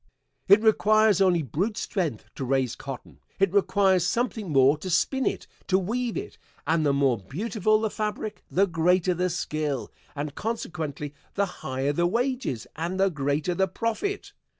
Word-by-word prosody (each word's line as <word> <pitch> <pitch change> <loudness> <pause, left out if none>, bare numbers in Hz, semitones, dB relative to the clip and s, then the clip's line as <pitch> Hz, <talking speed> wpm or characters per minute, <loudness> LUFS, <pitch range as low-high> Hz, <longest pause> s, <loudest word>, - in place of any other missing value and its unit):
It 200 +3 +7
requires 215 -2 +4
only 180 -4 +3
brute 190 - -2
strength 165 - -2
to - - -5
raise 130 -2 +1
cotton; 135 -2 -9 0.2
it 195 -2 +2
requires 195 -2 +3
something 225 -1 -1
more 135 0 +5
to 185 - -5
spin 260 +10 +1
it, - - -2 0.2
to 190 - +3
weave 230 +5 -2
it, - - -7 0.3
and 160 +1 +2
the 145 - +3
more 135 -5 +2
beautiful 215 - 0
the 220 -1 -1
fabric 215 0 -4
the 195 +3 +3
greater 180 +1 +2
the 180 +1 0
skill, 155 -6 -3 0.2
and 145 0 -4
consequently 155 -9 -4 0.2
the 200 - +2 0.2
higher 135 +2 -1
the 175 +3 +2
wages 240 - -1
and 170 +4 -3
the 195 0 +3
greater 150 +3 -1
the 190 +2 +1
profit. 235 - -3
180 Hz, 160 wpm, -26 LUFS, 145-215 Hz, 0.3 s, It